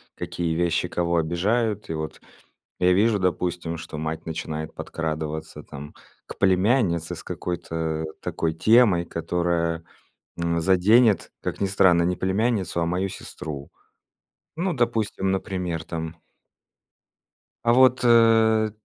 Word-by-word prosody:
какие 85 -2 -3
вещи 85 +1 +1
кого 85 -1 0
обижают. 105 +6 0
И - - -2
вот 80 -1 -5 0.6
я 90 0 +4
вижу, 105 +3 +3
допустим, 90 -2 -1
что 80 -1 -8
мать 80 +1 -4
начинает 80 -1 -5
подкрадываться 80 -1 -5
там 70 +2 -10 0.3
к - - -10
племяннице 95 -3 +2
с - - -9
какой-то 80 -2 -3 0.2
такой 80 -1 -2
темой, 110 -1 +4
которая, 85 -1 -1 0.5
м, 85 0 0
заденет, 100 +5 +4
как - - -4
ни 100 - +2
странно, 95 -3 +4
не 90 +1 0
племянницу, 95 -1 0
а - - +1
мою 90 +3 -1
сестру. 75 -6 -8 0.9
Ну, 180 +3 -1
допустим, 115 - 0
например 90 -4 -3
там 80 0 -5 1.5
"а 120 - +4
вот, 130 0 +5
э, 115 -2 +5
90 Hz, 120 wpm, -24 LUFS, 80-105 Hz, 1.5 s, вот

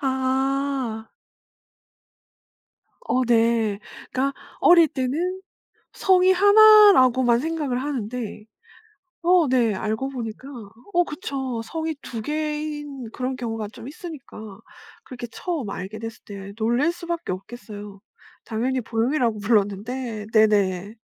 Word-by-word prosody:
아. 265 -3 -1 1.9
어 255 - 0
네. 225 -3 +2 0.3
그러니까 275 +2 0 0.3
어릴 340 -2 +7
때는 320 +9 -2 0.5
성이 375 0 +4
1 420 +2 +8
라고만 255 -5 +4
생각을 290 -4 -2
하는데 245 -5 -4 0.8
어 345 -4 +4
네. 240 -5 +2
알고 220 +7 -2
보니까 245 0 -6 0.4
어 350 0 +3
그쵸. 270 -7 -4
성이 320 +6 -4
2 230 -3 -6
개인 300 -3 -4
그런 255 +1 -3
경우가 225 -4 -4
좀 230 +4 -11
있으니까 260 - -10 0.5
그렇게 245 -2 -7
처음 295 - -4
알게 195 +3 -6
됐을 225 0 -7
때 200 -1 -9
놀랄 240 +9 +1
수밖에 340 - -4
없겠어요. 205 0 -9 0.4
당연히 250 +4 -1
보영이라고 230 0 0
불렀는데 215 +2 -1
네네. 205 -2 +2
255 Hz, 225 characters per minute, -23 LUFS, 220-300 Hz, 1.9 s, 1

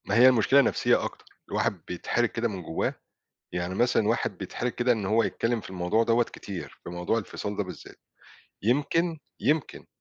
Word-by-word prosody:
ما 100 - 0
هي 125 +3 +8
المشكلة 130 +3 +5
نفسيّة - - +2
أكتر، - - -6 0.2
الواحد 95 - 0
بيتحرج 115 +6 0
كده 120 0 -1
من 100 -5 -5
جوّاه. 80 - -1 0.6
يعني 90 +1 -2
مثلًا 120 +1 +3
الواحد 110 +3 0
بيتحرج 125 +1 -3
كده 125 +1 +1
إن 110 -4 0
هو 110 +4 +3
يتكلّم 115 -1 0
في - - -10
الموضوع 95 +4 +1
دَوَّة 115 +1 +3
كتير، 100 -5 -8
في - - -7
موضوع 90 +5 -1
الفصاّل 105 -1 -5
ده 105 - +1
بالذات. 90 - -10 0.7
يمكن، 150 - +1 0.2
يمكن، 150 -1 0
115 Hz, 175 wpm, -27 LUFS, 95-120 Hz, 0.7 s, هي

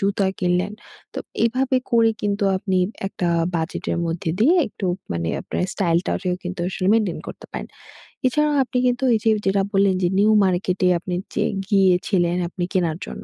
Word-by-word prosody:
জুতা 200 -1 +1
কিনলেন। 180 +3 0 0.4
তো - - -3 0.3
এভাবে 260 +3 +1
করে 230 -1 +4
কিন্তু 205 0 0
আপনি 190 0 -1 0.3
একটা 180 -2 -2 0.3
বাজেটের 165 +1 -2
মধ্যে 165 0 -2
দিয়ে, 300 +11 +5
একটু 200 -2 -5 0.3
মানে 85 -1 -2
আপনার - - -3
স্টাইলটারেও 180 0 0
কিন্তু 180 0 -5
আসলে 185 0 -3
মেইনটেইন 210 -7 +1
করতে - - -10
পারেন। - - -5 0.6
এছাড়াও 300 +3 +2
আপনি 255 - -4
কিন্তু 245 +1 0
এই - - +1
যে, 225 - +3 0.2
যেটা 195 0 +2
বললেন 195 -1 +3
যে - - +4
নিউ 215 +2 +5
মার্কেটে 185 0 +1
আপনি 180 0 -4 0.2
যে - - +1 0.3
গিয়েছিলেন 180 -3 +2
আপনি 180 - -4
কেনার 170 -4 0
জন্য। - - -8
190 Hz, 165 wpm, -22 LUFS, 180-220 Hz, 0.6 s, দিয়ে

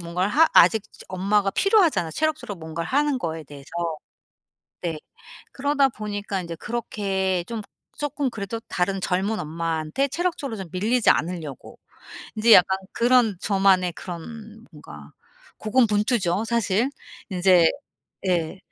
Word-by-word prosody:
뭔가를 180 +3 -1
하 320 +4 +5
아직 220 -2 +6 0.3
엄마가 195 +2 +1
필요하잖아 355 - +3
체력적으로 305 - -2
뭔가를 160 +1 -5
하는 290 0 +1
거에 160 -5 -4
대해서. 140 0 -13 1.1
네. 165 -3 -3 0.5
그러다 280 0 +2
보니까 205 -3 -4
인제 170 -1 -6
그렇게 195 -5 -2
좀 230 -2 -4 0.4
쪼끔 290 -2 -2
그래도 215 +1 -5
다른 190 +2 -1
젊은 195 +4 -1
엄마한테 160 - -2
체력적으로 290 -6 -3
좀 190 -3 -6
밀리지 220 +6 +2
않으려고 160 -5 -2 0.6
인제 225 +1 +5
약간 190 +1 +7 0.2
그런 235 -4 +3
저만의 190 -3 +3
그런 215 +7 -9
뭔가 75 - -13 0.5
고군분투죠 215 -4 +1
사실. 230 +1 +1 0.4
인제 180 -2 +4 0.6
예. 170 -1 0
200 Hz, 290 characters per minute, -24 LUFS, 175-235 Hz, 1.1 s, 약간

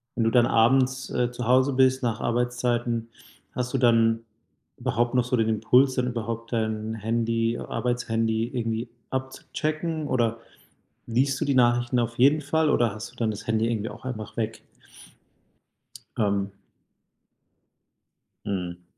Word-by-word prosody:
wenn 115 - +1
du - - +4
dann 120 +1 +4
abends, 130 +3 +2
äh, 125 0 0
zu 120 -1 -5
Hause 130 +2 +4
bist 130 0 +3
nach 115 -2 0
Arbeitszeiten, 120 -1 -1 0.5
hast 125 0 -3
du - - +2
dann 115 -2 +4 0.6
überhaupt 120 +2 0
noch 125 - +4
so 125 +1 0
den 115 -1 +2
Impuls, 125 +4 +3
dann 125 0 0
überhaupt 115 -1 -4
dein 110 -1 -1
Handy 115 +1 0
Arbeitshandy 115 -2 -1
irgendwie 115 -1 -2 0.2
abzuchecken 155 +4 -3
oder 115 -4 0 0.7
liest 130 +3 +1
du - - +1
die 140 -2 +1
Nachrichten 120 0 +3
auf 115 0 -2
jeden 145 +4 +5
Fall 155 +2 +1
oder 120 -6 +2
hast 110 +3 -8
du - - -23
dann 115 -2 0
das 105 - -8
Handy 115 0 +1
irgendwie 115 -1 -2
auch - - -12
einfach 110 -5 -6
weg? 110 -1 -3 1.6
Ähm 100 -2 0 1.9
Mhm. 90 -3 -4
120 Hz, 140 wpm, -25 LUFS, 115-130 Hz, 1.9 s, jeden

